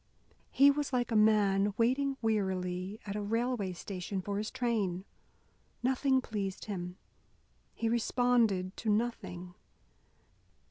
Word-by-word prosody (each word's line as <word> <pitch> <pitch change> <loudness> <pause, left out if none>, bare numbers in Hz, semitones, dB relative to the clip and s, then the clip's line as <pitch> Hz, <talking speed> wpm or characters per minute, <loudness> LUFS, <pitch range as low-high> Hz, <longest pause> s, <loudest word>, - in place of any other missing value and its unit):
He 280 +1 +6
was 290 0 -2
like 245 -2 0
a - - +1
man 205 -2 +4
waiting 270 +4 +1
wearily 190 -2 -1
at 200 -1 -4
a 210 - -2
railway 225 -2 -1
station 190 +2 -5
for 200 +2 -3
his 215 - -3
train. 215 -8 -1 0.8
Nothing 265 +1 +2
pleased 200 -5 -4
him. 180 -3 -5 0.8
He 230 - -1
responded 230 -5 +2
to 225 - -2
nothing. 205 -5 -2
210 Hz, 120 wpm, -32 LUFS, 190-240 Hz, 0.8 s, He